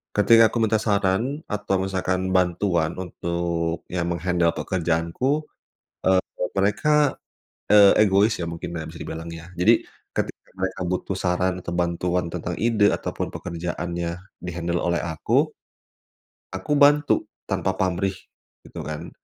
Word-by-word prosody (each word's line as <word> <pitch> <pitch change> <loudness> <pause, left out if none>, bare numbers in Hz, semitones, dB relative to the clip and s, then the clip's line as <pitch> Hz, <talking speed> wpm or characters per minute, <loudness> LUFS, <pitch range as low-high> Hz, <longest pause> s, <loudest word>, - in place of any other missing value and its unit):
ketika 115 +2 +6
aku - - -2
minta 110 0 +2
saran 105 +8 0
atau 105 -1 -1
misalkan 95 -1 -1
bantuan 90 -2 +1
untuk 85 -2 -2
ya 90 -1 -1
meng-handle 85 0 +1
pekerjaanku, 90 - 0 0.6
eee, 95 0 +5 0.4
mereka, 145 +9 +3 0.6
eee, 105 -1 +8 0.2
egois 100 +3 +4
ya 85 - -2
mungkin 85 0 -5
nah 80 -1 -4
bisa 80 +1 -10
dibilang 80 +1 -6
ya, 85 +1 -9
jadi 110 +6 +5 0.3
ketika - - -4
mereka 95 0 -2
butuh 95 +1 -2
saran 90 0 0
atau 85 - -5
bantuan 90 0 0
tentang 85 0 -3
ide 110 -3 +4
atau - - -4
pun - - -2
pekerjaannya 85 0 -4 0.3
di-handle 85 0 -2
oleh 85 -1 +1
aku, 80 -3 +1 1.1
aku 95 +9 -5
bantu 145 +1 +5 0.4
tanpa - - 0
pamrih, 95 +1 0 0.5
gitu - - -8
kan, 75 0 -5
90 Hz, 130 wpm, -24 LUFS, 85-100 Hz, 1.1 s, eee